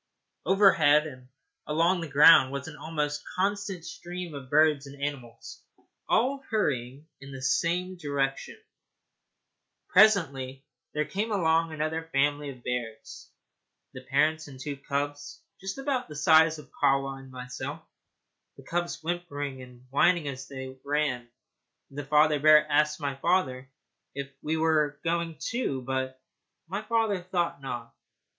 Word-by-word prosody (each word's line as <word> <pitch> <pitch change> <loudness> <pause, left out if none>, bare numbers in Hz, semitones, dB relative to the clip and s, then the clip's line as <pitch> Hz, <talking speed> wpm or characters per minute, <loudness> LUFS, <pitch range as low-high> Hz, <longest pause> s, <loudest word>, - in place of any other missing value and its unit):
Overhead 165 -6 +5
and 130 -4 -10 0.4
along 170 +4 +2
the 165 - -5
ground 145 -2 +7
was 140 0 -5
an 160 - -8
almost 150 -2 -3
constant 195 -2 -1
stream 175 -1 -7
of 135 -3 -8
birds 150 -1 +3
and 140 0 -12
animals, 130 -5 -6 0.5
all 270 +3 +2
hurrying 140 - -1
in 140 0 -11
the 135 - -7
same 180 +6 0
direction. 140 -4 -2 1.3
Presently 140 -10 +3 0.3
there 150 0 +1
came 210 +7 -3
along 165 -4 +2
another 155 +1 -3
family 145 +1 +1
of 125 -3 -11
bears, 120 -3 -5 0.6
the 130 - -8
parents 155 +4 +1
and 135 -2 -12
two 145 +1 -4
cubs 145 +1 -4 0.2
just 190 +4 -5
about 270 -2 -2
the 150 - -8
size 160 +1 +5
of 145 -4 -13
Kahwa 135 -1 +1
and 135 0 -13
myself, 125 0 -7 0.7
the - - -13
cubs 175 -1 -3
whimpering 145 -6 -4
and 125 0 -14
whining 165 +2 +3
as 135 -1 -6
they 130 -1 -8
ran. 140 -4 -1 0.6
The 145 0 -6
father 150 +1 +4
bear 150 +1 +7
asked 150 +1 +2
my 140 -2 -3
father 135 -6 0 0.5
if 140 0 -5
we 160 +1 -1
were 155 -2 +2
not - - -38
going, 165 -1 -1
too; 185 - -2
but 130 0 -3 0.5
my 195 +5 -3
father 220 -4 0
thought 175 -4 -2
not. 120 -3 -6
150 Hz, 140 wpm, -28 LUFS, 135-170 Hz, 1.3 s, ground